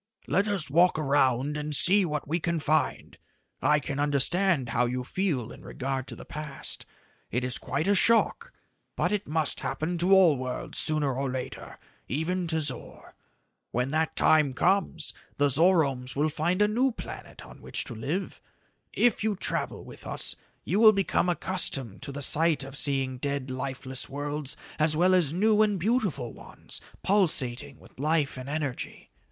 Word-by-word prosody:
"Let 200 +3 +1
us 200 -6 +2
walk 170 +4 +3
around 140 -1 +1
and 150 0 0
see 195 +6 +7
what 150 -4 -4
we 165 +4 -1
can 170 0 -1
find. 155 0 -1 0.4
I 150 0 +3
can 140 -1 -5
understand 145 +1 +2
how 120 +2 +1
you 125 +1 -3
feel 145 - -2
in - - -12
regard 135 0 -4
to - - -8
the - - -11
past. 150 -2 -7 0.4
It 125 +2 -2
is 125 -1 0
quite 160 - -2
a 205 - +4
shock 230 - +2 0.4
but - - 0
it 205 -1 -2
must 155 -1 -1
happen 170 +2 -3
to 180 +3 +1
all 185 -7 +6
worlds 125 0 -2
sooner 150 -3 +3
or 135 +1 -2
later 130 -1 -6 0.3
even 170 +6 -2
to 160 -1 0
Zor. 145 - -3 0.6
When 125 +3 -2
that 160 +1 0
time 150 -4 +3
comes, 180 -2 +1 0.2
the 145 0 +3
Zoromes 140 -4 +2
will 150 +3 +1
find 170 +6 0
a - - +3
new 250 +5 +1
planet - - -10
on - - -14
which - - -2
to - - -8
live. - - -4 0.5
If 240 -3 +2
you 215 -2 0
travel 190 - -3
with - - -11
us, - - -2 0.3
you 200 - 0
will 220 -1 +8
become 195 -2 0
accustomed 155 - -1
to 140 +1 -4
the 140 +1 -4
sight 160 0 +3
of 135 +1 -9
seeing 135 -3 +1
dead, 140 -1 -3
lifeless 130 0 -4
worlds 145 0 -3 0.2
as 155 0 +3
well 180 +3 +4
as 175 -6 +3
new 210 +5 +3
and 210 -3 +2
beautiful 195 - -1
ones - - -7 0.2
pulsating 150 -11 +1
with - - -19
life 150 0 0
and 130 +1 -8
energy. 145 -4 -5
150 Hz, 170 wpm, -27 LUFS, 135-180 Hz, 0.6 s, will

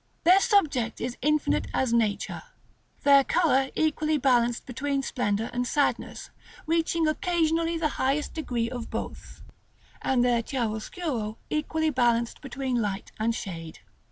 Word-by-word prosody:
Their 360 +3 +7
subject 315 - +2
is 245 - -3
infinite 300 +2 +1
as 255 -3 +1
nature, 220 -3 0 0.6
their 280 -1 +7
color 270 -5 +2
equally 310 0 +1
balanced 245 -3 +2
between 275 +2 -2
splendor 220 -4 -1
and 245 0 -1
sadness, 285 +3 -1 0.3
reaching 330 0 +1
occasionally 330 0 +1
the 325 -1 +1
highest 275 +3 0
degrees 240 -7 -2
of 245 -2 -5
both, - - -7 0.6
and 250 -2 +2
their 240 -1 +3
chiaroscuro 230 - -3
equally 315 +1 0
balanced 240 -3 +1
between 265 -3 -2
light 200 -1 -3
and 225 +1 +1
shade. 165 -7 -6
265 Hz, 130 wpm, -27 LUFS, 235-310 Hz, 0.6 s, Their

